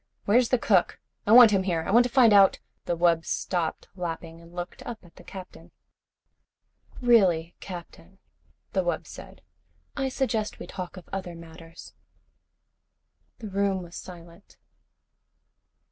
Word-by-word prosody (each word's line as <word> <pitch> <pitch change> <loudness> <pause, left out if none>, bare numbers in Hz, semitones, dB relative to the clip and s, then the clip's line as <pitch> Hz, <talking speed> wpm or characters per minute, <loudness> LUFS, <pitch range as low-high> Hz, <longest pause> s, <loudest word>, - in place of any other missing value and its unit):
Where's 235 +3 +3
the 255 - +3
cook? 195 -6 +1 0.3
I - - +2
want 235 -1 +9
him 195 -2 +2
here. 175 -4 -1
I - - -3
want 240 +3 +6
to 250 - -3
find 240 -5 +5
out 195 -1 +6
" - - -48
The 170 - -1
wub 170 -1 +3
stopped 175 -2 -3
lapping 165 -2 -6
and 170 0 -16
looked 175 0 -7
up 230 -6 -8
at 170 - -20
the 180 - -15
Captain. 185 0 -11 1.3
"Really, 185 -9 +3
Captain," 180 0 -10 0.6
the - - +1
wub - - -2
said. - - -12 0.5
"I 270 -2 -1
suggest 240 -5 -2
we - - -8
talk 185 -1 -7
of 185 - -12
other 185 -3 -5
matters." 165 0 -13 1.4
The 220 -4 -8
room 195 -1 0
was 175 0 -12
silent. 170 +1 -12
185 Hz, 145 wpm, -26 LUFS, 170-215 Hz, 1.4 s, want